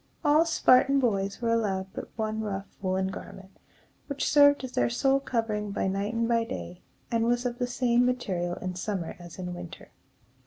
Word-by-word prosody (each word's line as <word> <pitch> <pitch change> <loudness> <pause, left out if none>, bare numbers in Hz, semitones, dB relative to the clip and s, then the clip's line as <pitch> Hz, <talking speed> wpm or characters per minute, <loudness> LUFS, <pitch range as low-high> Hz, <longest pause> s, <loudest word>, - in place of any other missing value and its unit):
All 300 +3 +5
Spartan 275 -3 +4
boys 200 -3 -1
were 230 0 +2
allowed 195 -4 -1
but - - -7
one 220 0 -2
rough 195 -2 -3 0.2
woolen 190 0 0
garment, 190 0 -10 0.5
which 280 -1 -2
served 285 -1 +5
as 260 - -5
their - - +1
sole 270 +3 +2
covering 225 -5 -2
by 200 - -2
night 200 +4 -2
and 230 0 +1
by 230 -1 +2
day, 85 - -7 0.3
and 230 -1 +2
was 240 +1 +1
of 240 0 -2
the 245 - 0
same 245 0 +2
material 190 -9 -1
in 185 0 -5
summer 185 -1 -4
as 175 -1 -11
in 180 -1 -5
winter. 175 -1 -10
220 Hz, 185 wpm, -28 LUFS, 190-245 Hz, 0.5 s, All